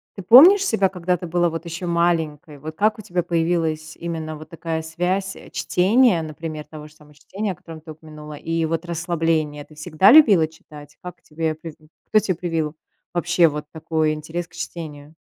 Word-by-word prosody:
ты 195 - -7
помнишь 330 - +8
себя, 200 - +2
когда 180 -1 -1
ты 175 - -7
была, 175 +1 +1
вот, 165 +1 -6
ещё 170 +2 -5
маленькой? 165 -3 -1
Вот 155 +3 -9
как 215 +1 +2
у - - -8
тебя 180 -3 -2
появилась 165 -2 -1
именно 160 -2 -5
вот 155 0 -11
такая 165 -1 -4
связь 180 +4 -2 0.2
чтения, 205 0 +3
например, 155 0 -6
того 150 -1 -11
же 150 - -19
самого 150 -1 -20
чтения, 195 +8 -4
о - - -7
котором 160 -1 -12
ты 160 0 -10
упомянула, 150 -1 -11
и 165 +2 -2
вот 165 +1 -2
расслабление? 165 -3 -1
Ты 155 - -18
всегда 155 +4 +3
любила 210 - +7
читать? 150 -2 -15
Как 180 0 -9
тебе 160 0 -3
призн 155 -1 -12 0.2
кто 215 - +4
те 205 -3 -1
привил 165 -3 -3 0.4
вообще 175 -1 +3
вот 150 0 -6
такой 160 -1 0
интерес 160 +3 -5
к - - -30
чтению? 150 -3 -8
165 Hz, 185 wpm, -22 LUFS, 155-175 Hz, 0.4 s, помнишь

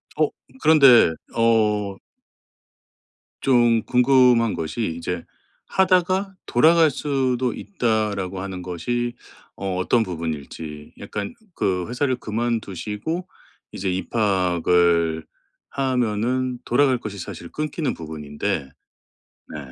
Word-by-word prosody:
어! 155 -1 +2 0.3
그런데 135 - +7 0.2
어 105 -4 +2 1.4
좀 120 -4 +3
궁금한 125 -3 +4
것이 80 +3 -3
이제 85 0 -4 0.4
‘하다가 190 +1 +2
돌아갈 160 +5 +5
수도 130 -3 0
있다.‘라고 105 - -2
하는 95 -2 -5
것이 120 +8 -3 0.4
어 95 -1 -3
어떤 110 +5 +2
부분일지 80 -3 -6
약간 100 -1 -5 0.2
그 90 -2 -1
회사를 130 +1 0
그만두시고 115 - -3 0.4
이제 95 -1 -3
입학을 90 -5 +1 0.4
하면은 125 -1 -1
돌아갈 130 +1 +3
것이 100 -3 -7
사실 85 -2 -8
끊기는 155 -2 -2
부분인데 75 -4 -4 0.9
네. - - -5
110 Hz, 215 characters per minute, -22 LUFS, 90-130 Hz, 1.4 s, 그런데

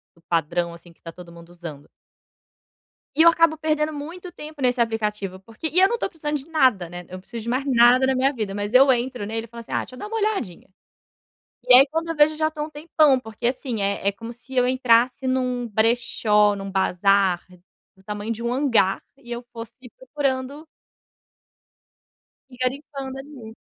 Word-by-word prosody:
do 170 - -25
padrão, 170 +1 0
assim, 170 0 -15
que - - -39
tá 165 - -8
todo 175 0 -13
mundo 170 0 -14
usando. 165 -5 -10 1.3
E - - +4
eu 335 - +9
acabo 330 -1 +3
perdendo 310 0 0
muito 335 +5 -8
tempo 305 -3 -10
nesse 250 0 +1
aplicativo, 210 -4 -2
porque 225 +10 -6
e 335 +3 +2
eu 385 - +7
não 475 - -1
tô - - -1
precisando 300 -3 -3
de 270 - -11
nada, 255 - +2
né? 175 +1 -8
Eu 185 - -8
preciso 230 +4 -8
de 235 - -5
mais 260 +3 -1
nada 250 0 +5
na 265 0 +1
minha 265 +2 +2
vida, 215 -6 -4
mas 205 +3 -4
eu 270 +1 +7
entro 245 -2 -2
nele 225 +2 -4
e - - -16
falo 235 0 -9
assim: - - -14
"Ah - - +1
deixa 255 - -8
eu - - -12
dar - - -6
uma 450 +1 -4
olhadinha". 405 - -2 1.0
E 250 - +5
aí 270 +2 +9
quando 325 +1 -2
eu 330 - -2
vejo, 300 +1 +4
já 310 0 +1
tô 305 -1 -5
um 305 - -6
tempão, 300 -2 +2
porque 220 -1 -4
assim, 245 -3 -2
é 200 0 -1
é 200 - +4
como 230 +4 -9
se 260 +2 -12
eu 250 -1 +3
entrasse 250 0 +2
num 250 -2 -1
brechó, 220 -2 +2
num 195 0 -6
bazar 190 -1 +2 0.5
do 190 - -23
tamanho 210 +2 -5
de 230 0 -5
um 235 +1 -1
hangar 235 -8 +2
e 240 - -17
eu 240 +1 -5
fosse 235 +2 -11
procurando 285 - -3 1.9
E 250 - -13
garimpando 270 +1 -4
ali. 270 -6 -11
245 Hz, 200 wpm, -23 LUFS, 205-285 Hz, 1.9 s, eu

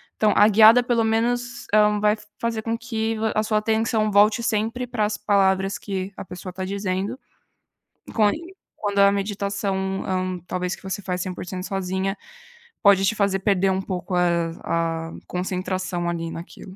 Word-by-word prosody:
Então, 215 -1 +3
a 210 - +7
guiada 220 +3 +7
pelo 240 -2 +1
menos, 240 +2 -1
hã, 210 -1 +4
vai 210 0 +3 0.2
fazer 230 -1 -1
com 230 +1 -2
que 225 -2 -2
va 220 0 0
a 215 - +3
sua 215 0 +1
atenção 220 0 +1
volte 210 +3 +4
sempre 225 +3 -1
para 235 -3 -1
as 210 0 -2
palavras 195 -2 +2
que 195 -1 -4
a - - -7
pessoa 180 0 -8
tá 190 - -5
dizendo, 195 +3 -3 0.9
com 215 -2 +4
em 340 - -6 0.2
quando 205 -1 -3
a 200 0 +7
meditação, 200 -1 -2
hã, 185 -1 -2
talvez 180 0 -2
que - - -19
você 190 +1 -4
faz 180 -2 -3
100% 185 0 -5
sozinha, 195 0 -2 0.7
pode 200 -2 +6
te 195 - +2
fazer 200 -2 +1
perder 195 -1 +2
um 190 0 0
pouco 185 -1 -4
a 180 0 +3 0.8
a - - -11
concentração, 180 -1 -2
ali, 165 -1 -3
naquilo. 180 +3 -10
200 Hz, 170 wpm, -23 LUFS, 185-220 Hz, 0.9 s, a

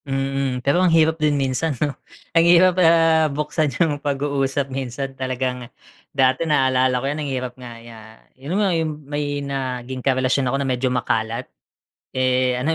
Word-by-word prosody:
Mm, 135 -2 -2
pero 145 +6 +3
ang 185 - +4
hirap 160 -1 +3
din 150 -1 +2
minsan 135 +2 -1
'no. 145 +3 -1 0.4
Ang 165 0 +5
hirap, 180 +1 +6
ah, 165 -2 +4
buksan 150 +1 -1
yung 150 -4 +1
pag-uusap, 140 -1 -1
minsan 135 +1 -4
talagang 130 -1 -3 0.4
dati 130 0 +2
naalala 130 -3 +2
ko 125 - -3
'yan, 145 +2 -2
ang 145 - -3
hirap 125 -2 -3
nga 120 -2 -11
'ya 115 -1 -12 0.3
yung 140 +8 -4
nga 200 -3 +2
yung 155 -3 -3
may 145 0 -3
naging 130 -2 -4
karelasyon 130 0 +1
ako 135 - 0
na 140 - -2
medyo 130 0 0
makalat. 120 -1 -1 0.7
Eh, 130 0 +1
ano, 135 - -2
135 Hz, 165 wpm, -21 LUFS, 130-150 Hz, 0.7 s, hirap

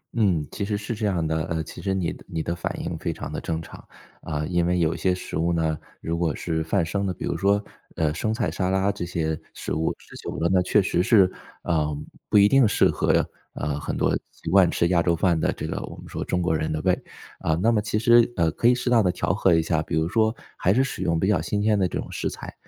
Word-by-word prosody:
嗯， 90 -10 +2
其 105 - -4
实 100 +1 -1
是 105 +3 -4
这 110 -1 -1
样 90 -5 0
的。 80 0 0
呃， 80 -2 -2
其 - - -10
实 95 - -1
你 90 -3 -1
的 - - -14
你 80 -1 -3
的 85 - -2
反 85 - -3
应 - - -3
非 - - -2
常 - - -6
地 - - -3
正 80 -1 -2
常。 - - -12 0.4
啊， 75 0 -3
因 85 +1 +1
为 90 +1 +1
有 85 0 +1
些 90 +2 +1
食 90 - -6
物 85 +1 +1
呢， 80 -2 0 0.2
如 85 +1 -2
果 80 -4 0
是 80 -2 -2
泛 80 +1 +1
生 100 +5 -2
的， 95 - -1
比 - - -5
如 - - -1
说， 100 +1 +2 0.3
呃， 75 -2 +1
生 110 +7 -1
菜、 110 0 -1
沙 90 -1 -1
拉 95 +1 +2
这 85 - -5
些 80 -2 -2 0.2
食 - - -4
物， 80 +1 0
吃 - - -16
久 - - -7
了 80 - +1
那 90 - +4
确 90 +3 +3
实 90 -2 +1
是， 100 -3 +5 0.3
啊 80 -3 +1 0.4
不 - - +4
一 100 - +7
定 135 +3 +5
适 105 - +3
合， - - +2 0.3
啊， 75 - -2
很 75 - -4
多 - - +2 0.2
习 - - -8
惯 95 -3 +6
吃 85 - +1
亚 90 -2 +3
洲 85 0 +2
饭 85 0 +2
的 - - +1
这 - - -5
个 - - -3
我 - - -7
们 - - -11
说 - - -4
中 90 - -1
国 80 -2 +1
人 80 0 -1
的 80 - -1
胃。 90 -1 +4 0.5
啊， 80 - +1
那 100 +8 +2
么 105 -2 +2
其 105 +1 -1
实， 120 +2 +5
呃， 85 -1 +2
可 115 - +1
以 125 - +6
适 125 0 -2
当 115 -3 +5
地 90 - +3
调 90 - -1
和 95 -2 +3
一 80 - +3
下， 80 -1 +1
比 - - -3
如 80 0 +1
说 110 +3 +2 0.2
还 90 - +2
是 130 - +4
使 135 - -4
用 85 -3 +1
比 95 - +1
较 105 -2 +2
新 105 - -1
鲜 105 -1 +3
的 95 - +3
这 - - -4
种 - - -5
食 - - -2
材， - - -8
90 Hz, 295 characters per minute, -24 LUFS, 80-100 Hz, 0.5 s, 一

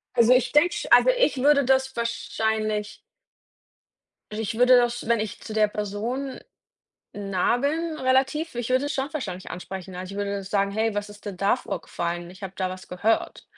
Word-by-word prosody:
Also 235 +1 +6
ich 255 0 +2
denke 340 +4 +4 0.2
also - - +7
ich - - +2
würde 280 -1 +4
das 265 0 +2
wahrscheinlich 220 -2 -2 1.3
ich 220 +1 -3
würde 250 +1 +7
das, 240 -1 0
wenn 235 -1 +3
ich 215 -2 -4
zu 215 - -7
der 215 -1 +4
Person 220 +7 -4 0.7
nah 200 +3 0
bin, 315 +4 -1
relativ, 265 +4 +1
ich 240 0 -3
würde 255 +2 +2
es 290 - -2
schon 270 +2 -2
wahrscheinlich 190 -11 -5
ansprechen. 185 0 -7
Also 185 +1 -6
ich 200 - -7
würde 200 -1 -2
sagen: 200 0 0
„Hey, 220 +1 0
was 205 0 -3
ist 205 +1 -14
denn 200 -3 -6
da 200 +2 +3
vorgefallen? 175 0 -4
Ich 190 +2 -13
habe 190 - -6
da 185 -1 -1
was 185 0 -9
gehört“. 205 +5 -1
220 Hz, 175 wpm, -25 LUFS, 200-260 Hz, 1.3 s, also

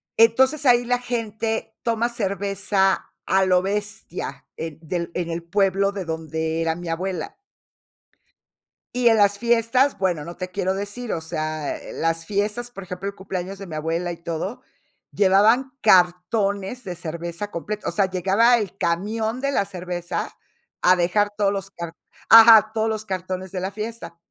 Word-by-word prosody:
Entonces, 260 +6 +4
ahí 245 -1 +5
la 245 0 +1
gente 225 -2 -3
toma 230 0 0
cerveza 200 -3 0
a 190 0 +3
lo 180 -1 +4
bestia, 205 -1 -4
en 160 -2 -5
del 170 +1 -3
en 170 -1 -2
el 165 - -3
pueblo 195 +2 +1
de 200 -2 -5
donde 160 0 -3
era 165 0 0
mi 175 0 -8
abuela. 175 0 -3 1.6
Y 245 -1 +4
en 225 - +4
las 200 -1 +4
fiestas, 235 +4 +2
bueno, 180 -5 0
no 170 +1 -9
te 185 0 -5
quiero 190 0 -1
decir. 205 +5 -4
O 165 - -3
sea, 155 -1 -3
eh, - - -10
las 165 0 -1
fiestas, 210 +5 -2
por 195 -5 -9
ejemplo, 185 +1 -6
el 200 - -10
cumpleaños 190 0 -5
de 195 - -8
mi 160 - -7
abuela 165 +3 -2
y 170 - -7
todo, 170 +6 -5 0.5
llevaban 210 +7 +4
cartones 195 +4 +2
de 180 -3 -5
cerveza 170 +3 -5
complet 210 +4 -5
o - - 0
sea, 200 -2 +2
llegaba 195 +6 +3
el 200 -4 -4
camión 220 +8 -1
de 275 0 0
la 260 - +2
cerveza 180 -2 -5 0.4
a 185 - +6
dejar 185 +4 +2
todos 200 -1 +2
los 195 -1 -5
cart 170 -3 -7 0.3
ajá, 225 -1 +9
todos 220 0 0
los 215 -1 -3
cartones 185 -1 -4
de 185 - -3
la 190 +2 -3
fiesta. 210 -5 -6
195 Hz, 165 wpm, -23 LUFS, 175-220 Hz, 1.6 s, ajá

